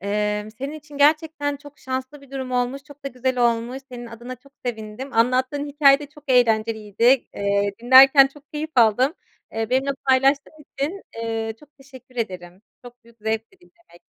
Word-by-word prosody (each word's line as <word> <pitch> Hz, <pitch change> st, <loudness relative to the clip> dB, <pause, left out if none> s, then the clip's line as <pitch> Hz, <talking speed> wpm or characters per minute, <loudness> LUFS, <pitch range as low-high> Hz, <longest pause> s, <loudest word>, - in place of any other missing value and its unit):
Emm, 210 Hz, +1 st, -2 dB
senin 270 Hz, +6 st, -6 dB
için 300 Hz, -2 st, -11 dB
gerçekten 295 Hz, -1 st, +2 dB
çok 290 Hz, +1 st, -15 dB
şanslı 260 Hz, +2 st, -5 dB
bir 275 Hz, -1 st, -18 dB
durum 265 Hz, -2 st, -5 dB
olmuş. 250 Hz, +2 st, -1 dB
Çok 285 Hz, -1 st, -17 dB
da -, -, -2 dB
güzel 255 Hz, 0 st, -2 dB
olmuş. 235 Hz, +1 st, +1 dB
Senin 240 Hz, -2 st, -8 dB
adına 235 Hz, +2 st, -9 dB
çok 275 Hz, +3 st, -23 dB
sevindim. 220 Hz, +2 st, -5 dB
Anlattığın 255 Hz, +5 st, +1 dB
hikâye 280 Hz, -1 st, +5 dB
de 295 Hz, -, -8 dB
çok 295 Hz, 0 st, -18 dB
eğlenceliydi. 225 Hz, 0 st, +2 dB
Eee, 200 Hz, 0 st, 0 dB
dinlerken 270 Hz, +2 st, +8 dB
çok 285 Hz, +1 st, -17 dB
keyif 305 Hz, +1 st, -4 dB
aldım. 245 Hz, +3 st, +4 dB, 0.4 s
Eee, 225 Hz, 0 st, -3 dB
benimle 265 Hz, +2 st, +1 dB, 0.2 s
paylaştığın 275 Hz, +3 st, +2 dB, 0.2 s
için, 310 Hz, +9 st, -3 dB
eee, 225 Hz, -1 st, -3 dB
çok 300 Hz, -, -18 dB
teşekkür 260 Hz, -2 st, -16 dB
ederim. 185 Hz, -4 st, -5 dB, 0.2 s
Çok 245 Hz, -1 st, -14 dB
büyük 235 Hz, 0 st, -21 dB
zevkti 220 Hz, -, -3 dB
dinlemek. 345 Hz, -, -23 dB
255 Hz, 165 wpm, -22 LUFS, 225-280 Hz, 0.4 s, dinlerken